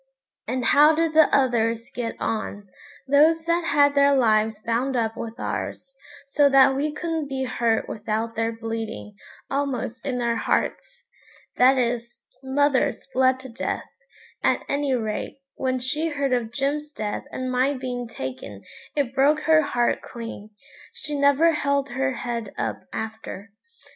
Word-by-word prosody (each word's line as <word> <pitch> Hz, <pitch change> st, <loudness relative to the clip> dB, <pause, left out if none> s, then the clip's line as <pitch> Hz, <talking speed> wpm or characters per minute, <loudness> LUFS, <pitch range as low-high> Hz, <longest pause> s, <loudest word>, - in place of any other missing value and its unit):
And 255 Hz, -1 st, -2 dB
how 300 Hz, +2 st, +6 dB
did 325 Hz, 0 st, +1 dB
the 315 Hz, -1 st, +6 dB
others 230 Hz, -3 st, +1 dB
get 235 Hz, -2 st, -3 dB
on, 205 Hz, -2 st, -3 dB, 0.4 s
those 315 Hz, +4 st, +4 dB
that 335 Hz, 0 st, +1 dB
had 285 Hz, -2 st, +4 dB
their 280 Hz, 0 st, +4 dB
lives 220 Hz, -3 st, +2 dB
bound 245 Hz, +4 st, 0 dB
up 225 Hz, -2 st, 0 dB
with 230 Hz, 0 st, -7 dB
ours, -, -, -5 dB, 0.3 s
so 285 Hz, 0 st, +4 dB
that 270 Hz, 0 st, +6 dB
we 295 Hz, +3 st, 0 dB
couldn't 320 Hz, -1 st, -3 dB
be 265 Hz, -1 st, -2 dB
hurt 235 Hz, -3 st, 0 dB
without 220 Hz, +1 st, -3 dB
their 225 Hz, 0 st, 0 dB
bleeding, 225 Hz, -1 st, -5 dB, 0.4 s
almost 260 Hz, -4 st, -2 dB
in 255 Hz, -3 st, -2 dB
their 235 Hz, -1 st, 0 dB
hearts? -, -, -2 dB, 0.5 s
that 260 Hz, +2 st, +6 dB
is, 240 Hz, -1 st, -2 dB, 0.2 s
mother's 275 Hz, -1 st, +1 dB
bled 260 Hz, 0 st, +3 dB
to 260 Hz, -, -9 dB
death, 230 Hz, -, -3 dB, 0.6 s
at -, -, +1 dB
any 280 Hz, -2 st, 0 dB
rate; 220 Hz, 0 st, -3 dB, 0.2 s
when 255 Hz, -1 st, -1 dB
she 300 Hz, +6 st, -1 dB
heard 280 Hz, -4 st, -1 dB
of 235 Hz, -3 st, -1 dB
Jim's 290 Hz, +3 st, -2 dB
death 210 Hz, -7 st, -4 dB
and 255 Hz, 0 st, -3 dB
my 260 Hz, +3 st, +2 dB
being 250 Hz, -2 st, -4 dB
taken 130 Hz, -, -7 dB, 0.3 s
it 280 Hz, -4 st, 0 dB
broke 285 Hz, +3 st, +3 dB
her 315 Hz, 0 st, +5 dB
heart 245 Hz, -5 st, 0 dB
clean; 230 Hz, -3 st, -8 dB, 0.4 s
she 300 Hz, -, -5 dB
never 285 Hz, +3 st, +4 dB
held 280 Hz, -2 st, 0 dB
her 265 Hz, +2 st, -1 dB
head 235 Hz, -4 st, -4 dB
up -, -, -2 dB
after. 220 Hz, -2 st, -6 dB
260 Hz, 150 wpm, -24 LUFS, 230-285 Hz, 0.6 s, how